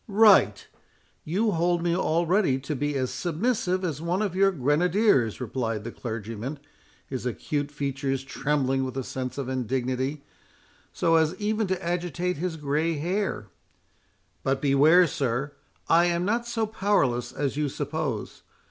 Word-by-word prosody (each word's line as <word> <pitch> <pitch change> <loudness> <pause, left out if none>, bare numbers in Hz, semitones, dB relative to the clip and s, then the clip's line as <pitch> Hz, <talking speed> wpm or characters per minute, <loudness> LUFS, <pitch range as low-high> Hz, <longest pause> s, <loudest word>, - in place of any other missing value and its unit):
"Right—you 200 - +2
hold 175 0 +1
me 170 -1 +1
already 175 -3 +2
to 145 +2 -3
be 145 +2 -1
as 130 -2 -1
submissive 185 +1 -1
as 155 -4 -3
one 175 +5 0
of 195 -4 -2
your 195 +1 +5
grenadiers," 150 - +2
replied 115 -3 -3
the 120 - -5
clergyman, 115 +4 -5 0.5
his 125 -3 -4
acute 145 +4 -2
features 135 -2 -2
trembling 135 -1 0
with 130 0 -4
a 135 - -1
sense 130 0 -5
of 140 -3 -3
indignity, 130 +2 -2 0.7
so 165 0 +2
as 160 +2 +2
even 215 +2 -1
to 185 -2 -2
agitate 175 0 -1
his 170 0 -3
grey 150 +3 0
hair; 175 - -2 0.9
"but 135 0 0
beware, 150 +6 +5
sir, 135 -2 -1 0.4
I 170 +1 +5
am 175 0 0
not 235 +4 0
so 225 -2 0
powerless 165 - 0
as 140 -1 -2
you 150 -1 0
suppose. 145 -4 -4
150 Hz, 140 wpm, -26 LUFS, 130-180 Hz, 0.9 s, your